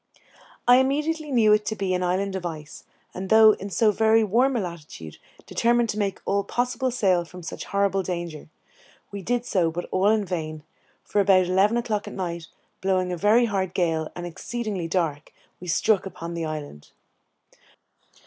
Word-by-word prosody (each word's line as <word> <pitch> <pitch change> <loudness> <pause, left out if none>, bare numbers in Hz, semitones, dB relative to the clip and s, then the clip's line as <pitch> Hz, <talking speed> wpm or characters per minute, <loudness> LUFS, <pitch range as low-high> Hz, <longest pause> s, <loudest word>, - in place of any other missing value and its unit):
I 245 +1 +8
immediately 300 +4 0
knew 220 -4 +5
it 210 0 +3
to 220 - -1
be 195 -3 -1
an 180 - 0
island 190 +2 -1
of 190 - -4
ice, 155 -3 -7 0.3
and 185 +1 -6
though 220 0 +8
in 200 -1 -5
so 210 +4 +3
very 220 +1 +3
warm 245 +6 +2
a - - +1
latitude, 155 - -8 0.3
determined 235 0 +1
to 210 - -2
make 200 -2 -1
all 200 0 +1
possible 250 +3 -1
sail 190 -8 +2
from 180 +1 -12
such - - -6
horrible 200 -1 +1
danger. 170 -5 -5 0.6
We 200 -1 -6
did 240 +5 -1
so, 175 -7 +1
but 175 +2 -5
all 190 +2 +3
in 215 -1 +2
vain, 155 -4 -4 0.4
for 205 - +1
about 190 -2 +4
eleven 195 +5 +2
o'clock 220 -4 -2
at - - -7
night, 170 -3 -4 0.3
blowing 185 -1 0
a - - -1
very 210 +7 +4
hard 190 -4 -2
gale, 160 -3 0
and 175 - -6
exceedingly 200 +1 -4
dark, 165 -4 -2 0.3
we 180 - -10
struck 195 +3 +2
upon 170 -2 -7
the 165 -1 -3
island. 150 - -7
190 Hz, 175 wpm, -24 LUFS, 175-220 Hz, 0.6 s, I